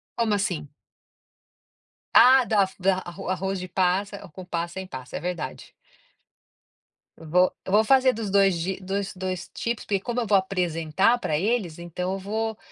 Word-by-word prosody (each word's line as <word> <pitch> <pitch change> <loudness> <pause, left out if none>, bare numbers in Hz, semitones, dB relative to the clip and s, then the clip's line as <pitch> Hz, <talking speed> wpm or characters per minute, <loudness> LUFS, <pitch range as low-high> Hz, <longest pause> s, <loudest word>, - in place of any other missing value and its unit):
Como 230 -3 +1
assim? 175 -7 -2 1.4
Ah, 260 +1 +8
da 210 -3 +3
f - - -16
da 190 0 +2
arro 175 +2 -7
arroz 190 +1 -1
de 185 - -7
passa 195 +2 0
com 185 - -8
passa, 170 -1 -3
sem 190 0 -5
passa, 130 -6 -8
é - - -2
verdade. 180 -2 -5 1.5
Eu 165 - -12
vou 180 +2 +4
eu 190 - -5
vou 215 +2 +5
fazer 260 +1 +4
dos 215 -2 -4
2 195 -2 +4
jei 185 +3 -3
dos 195 +1 -3
2 185 -1 -4
tipos, 235 -1 -3
porque, 200 -2 0
como 240 +4 -3
eu 225 - -3
vou 200 - +5
apresentar 180 +2 +1
pra 150 -9 -1
eles, 195 -4 -1
então 180 +2 -4
eu 195 - -4
vou 220 +3 -3
190 Hz, 175 wpm, -25 LUFS, 180-210 Hz, 1.5 s, Ah